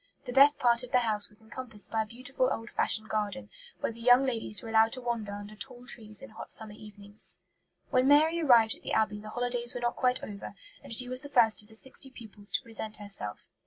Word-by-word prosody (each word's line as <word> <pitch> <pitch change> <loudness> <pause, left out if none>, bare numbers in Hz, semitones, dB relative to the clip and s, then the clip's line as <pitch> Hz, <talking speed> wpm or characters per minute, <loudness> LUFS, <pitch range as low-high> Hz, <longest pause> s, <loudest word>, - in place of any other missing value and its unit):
The 245 - -5
best 280 +3 +7
part 235 -1 +4
of 250 -1 -8
the 250 - +4
house 215 -3 0
was 210 +1 -2
encompassed 220 -2 -7
by 220 - +1
a - - -2
beautiful 255 +3 -1
old 225 +1 -4
fashioned 215 0 +1
garden, 215 +4 -3 0.3
where - - 0
the 230 +1 -12
young 245 +3 +6
ladies 225 -4 0
were 225 - -7
allowed 225 0 +4
to 255 - +1
wander 235 -4 -2
under 205 +1 -8
tall 250 +2 -10
trees 215 +1 -4
in 270 - -10
hot 220 - -9
summer 220 -1 -5
evenings." 205 -1 -3 0.5
When 255 +1 +3
Mary 315 +4 +5
arrived 235 -7 +5
at - - -15
the - - -4
Abbey 215 -1 +1
the 215 - -9
holidays 245 +1 -1
were 245 - -4
not 240 0 0
quite 250 -1 +1
over, 200 -1 -7 0.3
and - - -11
she 245 +2 +1
was 255 +1 -1
the 285 - -5
first 230 -6 +5
of 210 - -20
the 220 - -12
sixty 265 +3 -2
pupils 220 -5 -9
to - - +1
present 220 -1 -6
herself. 195 - -6
230 Hz, 235 wpm, -30 LUFS, 215-250 Hz, 0.5 s, best